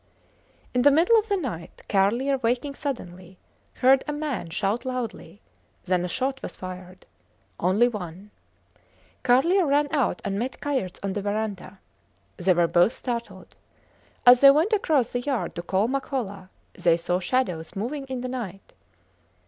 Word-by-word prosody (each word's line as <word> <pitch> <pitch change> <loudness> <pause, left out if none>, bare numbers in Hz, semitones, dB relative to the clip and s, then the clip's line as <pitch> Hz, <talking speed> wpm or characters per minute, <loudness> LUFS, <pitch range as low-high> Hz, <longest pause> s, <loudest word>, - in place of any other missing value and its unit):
In 250 - +2
the 285 - +7
middle 340 +11 +5
of 435 +1 -5
the 400 - +2
night, 230 - -6
Carlier 235 +8 +2
waking 250 +4 -1
suddenly, 185 - -6 0.4
heard 265 +1 +4
a - - -1
man 295 - -3
shout 200 +7 -1
loudly; 230 -7 -5 0.4
then 180 -1 +1
a - - -2
shot 265 +9 -2
was - - -7
fired. 185 0 -9 0.5
Only 195 +7 +3
one. 200 -2 -7 0.9
Carlier 275 +10 +4
ran 290 +1 +3
out 280 -5 +1
and 200 0 -2
met 250 +2 -4
Kayerts 260 -11 -2
on 195 -1 -2
the 205 - -3
verandah. 205 -1 -4 0.6
They 185 +1 +3
were 175 0 +3
both 175 +8 +3
startled. 235 -3 -6 0.7
As 245 0 +9
they 275 - +9
went 315 +10 +3
across 305 - +1
the 245 - 0
yard 265 -3 -2
to - - -5
call 190 +4 0
Makola, 240 -8 -3 0.2
they 170 -1 +2
saw 175 +1 -1
shadows 180 -6 -1
moving 265 +8 -4
in 260 -2 -5
the 255 - -3
night. 220 -7 -7
235 Hz, 155 wpm, -25 LUFS, 185-270 Hz, 0.9 s, As